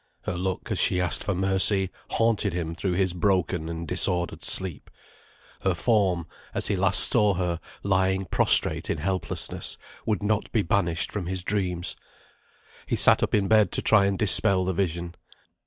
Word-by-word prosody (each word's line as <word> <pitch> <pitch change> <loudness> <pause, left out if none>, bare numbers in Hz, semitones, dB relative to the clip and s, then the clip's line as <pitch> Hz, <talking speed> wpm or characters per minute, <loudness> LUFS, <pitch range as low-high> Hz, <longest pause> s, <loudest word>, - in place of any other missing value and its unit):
Her - - -4
look, 90 +1 -4
as - - -1
she 90 - +2
asked 90 -3 0
for 100 - -2
mercy, 95 0 +2 0.2
haunted 115 -4 +1
him 85 -2 -4
through 90 +2 -3
his 95 -1 0
broken 90 -3 -1
and 85 0 -6
disordered 85 +2 +1
sleep; 90 -7 -2 0.7
her 95 -2 0
form, 95 -5 0 0.3
as - - 0
he - - 0
last - - +4
saw 105 -2 +4
her, 85 -2 -2 0.2
lying 95 0 0
prostrate - - +3
in - - -1
helplessness, 95 +3 -3 0.3
would 105 -3 -1
not 105 0 -1
be 110 - 0
banished 85 -1 -1
from 100 -5 -5
his 95 0 -4
dreams. 90 -3 -2 0.9
He - - -1
sat - - +5
up - - 0
in 100 -2 0
bed 110 -1 +3
to - - -3
try 105 -2 +4
and 100 -1 -2
dispel 95 +1 +3
the 95 - -1
vision. 85 -2 -3
95 Hz, 170 wpm, -25 LUFS, 85-100 Hz, 0.9 s, sat